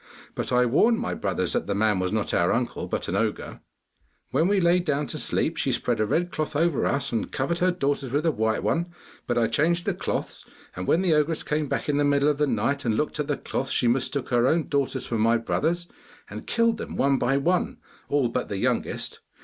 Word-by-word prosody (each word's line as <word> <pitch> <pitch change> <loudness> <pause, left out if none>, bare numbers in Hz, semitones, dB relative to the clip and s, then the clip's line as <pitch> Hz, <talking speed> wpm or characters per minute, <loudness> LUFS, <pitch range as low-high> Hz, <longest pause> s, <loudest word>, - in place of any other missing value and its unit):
But - - -3
I 125 0 +4
warned 220 - +3
my - - -2
brothers 95 -3 -1
that - - -1
the 100 - -1
man 105 -2 +2
was 95 0 -1
not 110 -1 -1
our - - +2
uncle, - - -1
but - - -3
an - - -2
ogre. - - -2 0.7
'When 155 +6 +2
we 200 0 +3
lay 175 0 +4
down 150 -4 -1
to - - -5
sleep, - - -1
she - - 0
spread - - 0
a 110 - +1
red 175 +9 0
cloth 155 -1 -3
over 165 0 +2
us, 140 - -1
and 115 - -2
covered 170 +6 -1
her 185 - +3
daughters 140 -6 -1
with 145 +6 0
a 165 - +4
white 110 -4 0
one; 170 +1 0 0.4
but 120 - 0
I 115 - +3
changed 165 +10 +1
the - - +1
cloths, - - -4 0.3
and 90 0 -5
when 175 - +3
the 175 -4 +3
ogress 150 +1 +1
came 150 0 -1
back - - -2
in 145 -1 +1
the 145 - +2
middle 145 0 +3
of 145 -1 -1
the 150 - +3
night, 135 +4 0
and 110 -3 0
looked 150 - -2
at 150 - -1
the 145 - -1
cloths, - - -3
she 125 - +2
mistook 130 +2 0
her 120 0 +3
own 160 +3 +1
daughters 140 -2 -1
for 115 - -2
my 115 +2 +4
brothers, 165 +9 -1 0.5
and - - -8
killed 230 -1 +2
them - - -6
one 135 0 +2
by 135 +3 +2
one, 175 +6 0 0.3
all 140 -3 +2
but 125 +2 -3
the 100 - -3
youngest. - - -2
140 Hz, 235 wpm, -25 LUFS, 120-165 Hz, 0.7 s, I